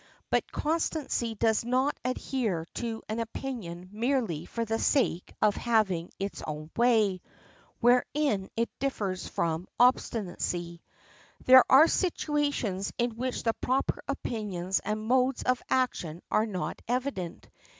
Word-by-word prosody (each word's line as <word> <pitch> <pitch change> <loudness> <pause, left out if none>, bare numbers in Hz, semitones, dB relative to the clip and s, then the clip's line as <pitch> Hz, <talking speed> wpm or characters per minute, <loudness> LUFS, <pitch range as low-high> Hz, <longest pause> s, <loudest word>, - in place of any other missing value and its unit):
But - - +1
constancy 300 -7 -1
does 220 +1 +2
not 255 +4 +1
adhere 240 -8 -1
to 230 -2 -4
an 220 +2 -3
opinion 220 -7 -5
merely 225 - -1
for 230 -1 -3
the 225 0 -1
sake 235 - +1
of 210 -1 +4
having 200 -8 +1
its 195 +1 -4
own 155 +1 -6
way, 220 -6 +3 0.6
wherein 245 -4 +2
it 230 0 0
differs 200 -9 -2
from 165 +2 -2
obstinacy. 180 -8 +1 0.6
There 260 0 +9
are 290 +5 +9
situations 290 - 0
in 240 0 +1
which 250 +3 -3
the 225 - +2
proper 260 +4 -1
opinions 205 -9 -2
and 215 +1 -3
modes 255 +2 +2
of 255 -1 +1
action 180 -10 0
are 215 +1 +3
not 185 -4 -4
evident. 245 -8 -3
225 Hz, 125 wpm, -29 LUFS, 190-255 Hz, 0.6 s, There